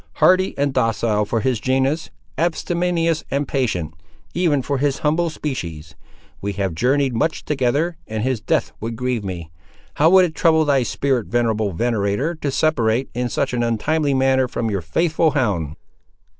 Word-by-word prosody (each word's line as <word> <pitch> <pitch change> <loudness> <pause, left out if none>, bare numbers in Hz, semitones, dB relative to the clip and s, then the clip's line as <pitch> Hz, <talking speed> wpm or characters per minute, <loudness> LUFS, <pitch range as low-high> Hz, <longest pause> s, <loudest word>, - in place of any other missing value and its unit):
Hardy 185 +1 +3
and 140 -1 0
docile 115 -3 +1
for 115 +2 -1
his 130 -2 0
genus; 135 +6 0 0.3
abstemious 170 +1 0
and 140 0 -1
patient, 105 - -1 0.4
even 160 -6 +1
for 140 0 -1
his 140 0 +1
humble 165 +3 +2
species. 85 - -5 0.5
We 100 +1 -2
have 95 -3 -2
journeyed 130 - +1
much 140 +8 -1
together, 150 +4 0
and 110 0 -3
his 130 -3 -1
death - - 0
would 115 +1 -4
grieve 125 -2 -2
me. 85 -4 -6 0.5
How 155 +2 +5
would 185 0 +7
it 165 - -4
trouble 160 -1 +3
thy 140 -2 +3
spirit, 125 0 -1
venerable 110 -3 0
venator, 115 - 0
to 155 -3 -3
separate, 130 -4 +1
in 125 0 -2
such - - -1
an 120 - 0
untimely 140 +6 +1
manner, 130 -1 +3
from 115 -2 -2
your 100 -2 -1
faithful 160 - +1
hound?" 85 - 0
130 Hz, 160 wpm, -21 LUFS, 110-155 Hz, 0.5 s, would